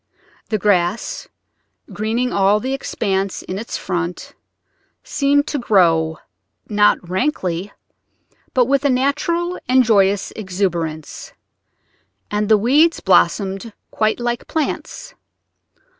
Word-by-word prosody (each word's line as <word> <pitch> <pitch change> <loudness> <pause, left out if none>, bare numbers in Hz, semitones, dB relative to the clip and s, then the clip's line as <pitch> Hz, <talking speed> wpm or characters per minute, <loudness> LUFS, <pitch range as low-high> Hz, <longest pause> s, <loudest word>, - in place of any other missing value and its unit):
The 215 - +1
grass 195 0 0 0.7
greening 230 +4 -1
all 200 +1 +3
the 260 +5 -3
expanse 195 -7 -2
in 185 +2 -5
its 230 - -5
front 175 -1 -4 0.7
seemed 285 0 +1
to 290 - -2
grow, 165 -8 +2 0.5
not 205 -4 +2
rankly, 185 - -2 0.8
but 250 -1 +4
with 275 +2 +1
a 285 - +3
natural 310 +7 0
and 255 0 +5
joyous 200 -3 +2
exuberance, 175 -6 -3 1.0
and 210 0 -1
the 215 - +6
weeds 290 +10 +3
blossomed 195 +4 +1 0.2
quite 215 +1 0
like 240 0 -3
plants. 320 - -4
210 Hz, 105 wpm, -19 LUFS, 190-255 Hz, 1.0 s, the